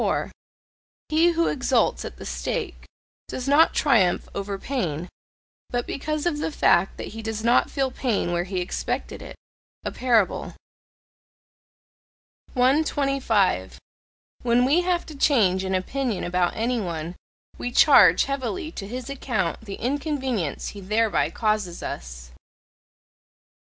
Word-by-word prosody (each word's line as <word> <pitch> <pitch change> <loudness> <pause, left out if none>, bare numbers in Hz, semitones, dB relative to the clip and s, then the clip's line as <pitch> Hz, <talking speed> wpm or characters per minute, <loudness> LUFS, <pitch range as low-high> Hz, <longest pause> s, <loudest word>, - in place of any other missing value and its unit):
He 330 +2 +4
who 335 0 +2
exults 260 - +1
at - - -8
the - - -9
stake, 430 -8 -4 0.4
does 255 +1 -5
not 295 +4 +5
triumph 220 - +3
over 200 0 -4
pain, 180 - -3 0.6
but 245 0 -2
because 305 +2 -3
of 320 -4 0
the 315 - -2
fact 185 - +2
that - - -6
he 225 +1 -8
does 220 0 -4
not 235 +1 +3
feel 270 -2 -1
pain 235 -9 -1
where 175 0 0
he 185 -1 -2
expected 180 - -3
it. - - -9 0.5
A - - -2
parable. 235 -6 +1 2.0
125. 260 - +1 0.6
When 245 +1 +3
we 300 +7 +3
have 355 -1 0
to 310 - -10
change 210 -10 +3
an 190 0 -1
opinion 230 +2 -2
about 175 0 0
any 235 +1 0
one, 170 -2 -4 0.4
we 245 - -3
charge 280 +3 +7
heavily 280 +5 -3
to 195 -11 -7
his 250 +3 -6
account 235 -10 -2
the 200 -3 -7
inconvenience 260 - -2
he 200 - -9
thereby 215 +3 +1
causes 215 -6 -1
us. - - -7
235 Hz, 130 wpm, -24 LUFS, 190-275 Hz, 2.0 s, charge